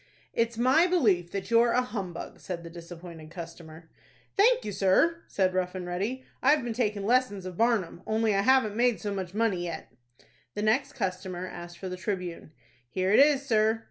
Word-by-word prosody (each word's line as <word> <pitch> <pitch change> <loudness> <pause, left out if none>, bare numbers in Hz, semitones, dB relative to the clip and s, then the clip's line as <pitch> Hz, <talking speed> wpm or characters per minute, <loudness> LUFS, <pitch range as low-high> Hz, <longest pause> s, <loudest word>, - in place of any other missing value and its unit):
"It's 230 0 0
my 260 +9 +4
belief 210 - +2
that 195 +2 -5
you're 235 0 +5
a 250 - +3
humbug," 200 -7 -6
said 175 -2 -6
the 170 - -9
disappointed 170 -2 -10
customer. 165 -1 -10 0.5
"Thank 460 - +4
you, 210 - -3
sir," 200 - +2
said 185 -2 +1
Rough 185 0 -1
and 185 -1 -4
Ready; 200 +9 -3 0.2
"I've 285 +1 +4
been 235 -1 -3
takin' 210 -4 -1
lessons 235 -5 +1
of 185 -1 -6
Barnum, 215 -6 +1
only 220 0 +1
I 195 - +2
haven't 245 -3 +3
made 240 0 +2
so 205 -1 -3
much 190 -1 -5
money 215 -6 +1
yet." 165 -8 -6 0.6
The 210 - -2
next 270 +7 +1
customer 185 -4 -3
asked 175 -1 -9
for 190 - -6
the 185 0 -5
"Tribune." 180 -5 -4 0.4
"Here 185 +6 0
it - - +6
is, 280 -1 +5
sir." 220 -2 +2
200 Hz, 185 wpm, -28 LUFS, 180-235 Hz, 0.6 s, it